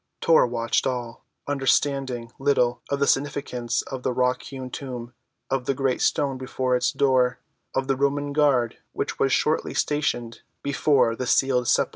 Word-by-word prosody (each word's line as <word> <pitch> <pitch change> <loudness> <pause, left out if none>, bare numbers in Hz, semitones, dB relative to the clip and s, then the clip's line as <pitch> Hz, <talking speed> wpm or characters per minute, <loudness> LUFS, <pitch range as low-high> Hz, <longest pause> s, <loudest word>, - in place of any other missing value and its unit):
Tor 165 -6 +5
watched 115 -1 0
all, 120 -3 -4 0.2
understanding 135 -3 0
little 125 -3 +2
of 140 - 0
the 140 - +3
significance 135 -4 0
of 130 -2 -6
the 130 - -1
rock‐hewn 125 +1 -1
tomb, 125 -3 -6 0.4
of 135 -2 0
the 135 - 0
great 135 -1 0
stone 135 -3 +1
before 130 0 -1
its 125 - +1
door, 130 -3 +2 0.4
of 135 - +1
the 135 - +2
Roman 140 +1 0
guard 140 -6 +2
which - - -3
was 135 - +2
shortly 155 +4 +1
stationed 120 -6 -1 0.2
before 135 -4 +2
the 125 +1 -4
sealed 125 -1 +2
sepulchre. - - +3
130 Hz, 155 wpm, -24 LUFS, 125-140 Hz, 0.4 s, Tor